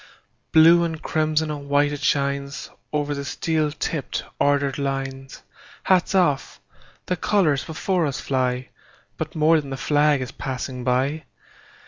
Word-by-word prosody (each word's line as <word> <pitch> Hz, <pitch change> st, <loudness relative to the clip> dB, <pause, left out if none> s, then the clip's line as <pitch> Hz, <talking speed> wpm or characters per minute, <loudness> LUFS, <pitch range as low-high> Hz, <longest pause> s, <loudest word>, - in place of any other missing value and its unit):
Blue 165 Hz, +2 st, +7 dB
and 160 Hz, -2 st, -3 dB
crimson 155 Hz, 0 st, 0 dB
and 140 Hz, -1 st, -7 dB
white 145 Hz, +1 st, +3 dB
it 145 Hz, -, -4 dB
shines, 140 Hz, 0 st, -1 dB, 0.2 s
Over 145 Hz, -1 st, -1 dB
the 140 Hz, 0 st, -4 dB
steel 155 Hz, +2 st, -1 dB
tipped, 150 Hz, -1 st, -3 dB, 0.2 s
ordered 140 Hz, -1 st, +1 dB
lines. 135 Hz, -1 st, -4 dB, 0.4 s
Hats 185 Hz, +1 st, +2 dB
off! 170 Hz, -8 st, +1 dB, 0.5 s
The 180 Hz, -, -1 dB
colors 175 Hz, -8 st, +1 dB
before 170 Hz, +1 st, 0 dB
us 140 Hz, -, -3 dB
fly; 130 Hz, -2 st, -1 dB, 0.5 s
But -, -, -5 dB
more 155 Hz, +1 st, +4 dB
than 140 Hz, -, -10 dB
the 135 Hz, -, -4 dB
flag 145 Hz, -1 st, +2 dB
is 130 Hz, +1 st, -5 dB
passing 130 Hz, -2 st, -5 dB
by. 135 Hz, +5 st, 0 dB
145 Hz, 140 wpm, -23 LUFS, 135-155 Hz, 0.5 s, Blue